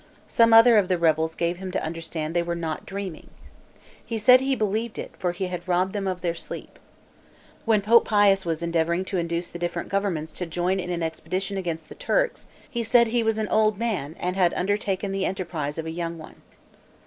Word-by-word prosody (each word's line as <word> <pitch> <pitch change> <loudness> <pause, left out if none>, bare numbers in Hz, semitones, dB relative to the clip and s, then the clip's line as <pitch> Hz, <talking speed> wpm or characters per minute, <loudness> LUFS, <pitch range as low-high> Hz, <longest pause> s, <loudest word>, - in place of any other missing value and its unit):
Some 230 0 +4
other 225 0 +8
of 195 - 0
the 185 -1 +1
rebels 160 -1 +1
gave 170 +1 -1
him 190 0 -6
to - - -1
understand 160 0 -4
they 175 - +3
were 170 0 -2
"not 165 -2 -4
dreaming." 195 -4 -6 0.7
He 230 - -4
said, 250 +4 +6
"he 270 0 +1
believed 215 +1 -2
it, - - -6
for 180 -2 0
he 180 +2 -3
had 180 -1 -5
robbed 185 +1 +1
them 200 -2 -2
of 185 -2 -3
their 170 -2 0
sleep." 165 - -9 0.9
When 215 -3 +3
Pope 230 +3 +5
Pius 205 -2 +4
was 165 -1 -2
endeavoring 170 +2 0
to 190 -1 -2
induce 170 +1 -3
the 175 - -7
different 175 0 -3
governments 180 -6 -1
to 180 - -5
join 180 +3 0
in 180 -1 -4
an 175 -1 -2
expedition 185 +5 -3
against 165 -4 -4
the - - -10
Turks, - - -1 0.2
he 250 -5 -3
said, 235 0 +4
"he 240 +1 +1
was 225 -1 +1
an 215 -1 -1
old 215 -2 +3
man, 195 -10 -2
and 180 +1 -2
had 180 -3 +2
undertaken 200 0 -1
the 195 0 0
enterprise 165 -6 -4
of 160 - -4
a 160 - -4
young 170 0 -4
one." 155 - -13
185 Hz, 210 wpm, -25 LUFS, 170-210 Hz, 0.9 s, other